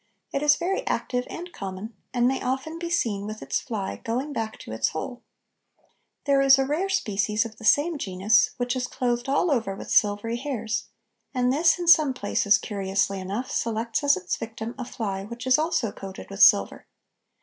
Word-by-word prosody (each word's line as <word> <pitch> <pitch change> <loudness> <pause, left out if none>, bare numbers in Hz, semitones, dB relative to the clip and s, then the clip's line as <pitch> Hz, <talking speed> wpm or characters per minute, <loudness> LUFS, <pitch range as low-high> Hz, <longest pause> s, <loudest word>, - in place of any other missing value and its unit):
It 275 - 0
is 295 0 +5
very 385 +7 -1
active 250 - -1
and 350 +1 -7
common, 195 +4 -6 0.2
and 245 -1 +2
may 265 +1 0
often 265 +6 -3
be 340 0 -4
seen 215 -12 0
with 215 0 -7
its - - -1
fly 205 -6 -4
going 255 +6 -3
back 220 -3 -3
to - - -9
its 110 - 0
hole. 245 +10 -6 1.0
There 275 -1 +3
is 270 0 +7
a 270 - +1
rare 315 +8 -1
species 210 - 0
of 225 -1 -9
the 225 - -9
same 295 +8 +3
genus, 210 +5 +3
which 245 0 -1
is 250 -1 -2
clothed 240 -1 -2
all 300 +5 +2
over 225 -8 0
with - - -8
silvery 210 +3 +2
hairs, 240 -4 -3 0.5
and 250 0 +2
this 325 +4 +4
in 350 -1 -4
some 310 -6 +6
places, 205 -2 +2
curiously 195 -1 -1
enough, 200 +7 -4
selects 230 +2 -1
as 285 -5 +4
its 180 -1 -3
victim 225 +1 -6
a 250 - -3
fly 200 -5 -4
which 235 +4 -8
is 260 +2 +4
also 310 -9 0
coated 195 0 -9
with 195 0 -4
silver. 100 - +5
240 Hz, 190 wpm, -25 LUFS, 205-275 Hz, 1.0 s, is